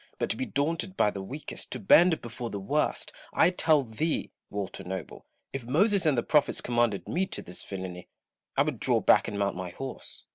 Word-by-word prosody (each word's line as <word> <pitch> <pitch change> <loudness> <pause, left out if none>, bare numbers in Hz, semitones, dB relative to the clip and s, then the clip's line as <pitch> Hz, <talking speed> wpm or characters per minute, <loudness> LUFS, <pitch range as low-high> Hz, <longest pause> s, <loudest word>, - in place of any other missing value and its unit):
but - - 0
to - - 0
be 260 - -3
daunted 165 +6 -1
by 105 - +4
the 100 - -5
weakest, 135 +11 -6
to 125 - -3
bend 165 - +6
before 120 0 -5
the 100 - -4
worst 95 - -1
— - - -25
I 175 - +4
tell 155 -5 +3
thee, 130 +8 -2 0.2
Walter 100 -2 -5
Noble, 95 -2 -6 0.3
if 135 -2 -4
Moses 190 - +3
and 145 -4 +3
the 120 - +2
Prophets 150 -2 +3
commanded 120 -4 0
me 190 +2 0
to - - -6
this 90 - -9
villainy, 95 -2 -6 0.5
I - - +6
would - - -3
draw - - +2
back - - +5
and 100 - -4
mount 100 -1 0
my 90 0 -4
horse. 135 +9 -8
Koble. - - -55
120 Hz, 215 wpm, -28 LUFS, 100-160 Hz, 0.5 s, bend